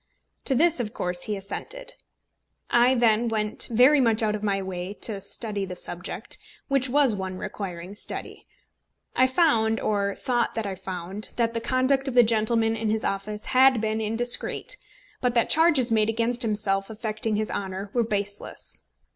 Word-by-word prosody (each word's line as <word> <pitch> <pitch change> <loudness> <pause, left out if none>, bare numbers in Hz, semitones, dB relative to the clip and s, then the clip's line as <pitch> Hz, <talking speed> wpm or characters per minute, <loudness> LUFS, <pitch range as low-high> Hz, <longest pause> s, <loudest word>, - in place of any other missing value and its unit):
To 270 - +2
this 330 +1 +3
of 215 -3 -4
course 180 0 -2
he 210 -1 -2
assented. - - -5 0.8
I 245 +2 +5
then 235 -1 +3
went 215 -2 +1
very 255 +6 +5
much 225 -2 +3
out 210 -1 +1
of 210 - -4
my 200 -2 0
way 190 0 -5
to 210 -3 0
study 205 0 -4
the 185 -1 -5
subject, 175 0 -5 0.3
which 275 -2 +2
was 270 -4 +3
one 190 -1 -5
requiring 185 -1 -6
study. 205 - -5 0.7
I 260 - +5
found, 230 -7 +2
or 200 -2 0
thought 240 -2 -1
that 225 -1 -2
I 200 - -3
found, 190 +2 -3
that 230 -1 0
the 230 - -2
conduct 265 +2 +1
of 265 - -3
the 245 - +8
gentleman 225 0 +2
in 220 -1 -2
his 220 0 -1
office 210 +2 -3
had 260 -1 +5
been 220 0 -1
indiscreet; 225 +3 0 0.5
but 245 -1 0
that 235 - +3
charges 305 -7 +5
made 215 -1 +3
against 230 +2 0
himself 205 -3 0
affecting 215 0 -2
his 215 +1 -2
honour 195 0 -4
were 240 - +2
baseless. 205 -2 -4
220 Hz, 170 wpm, -25 LUFS, 200-245 Hz, 0.8 s, the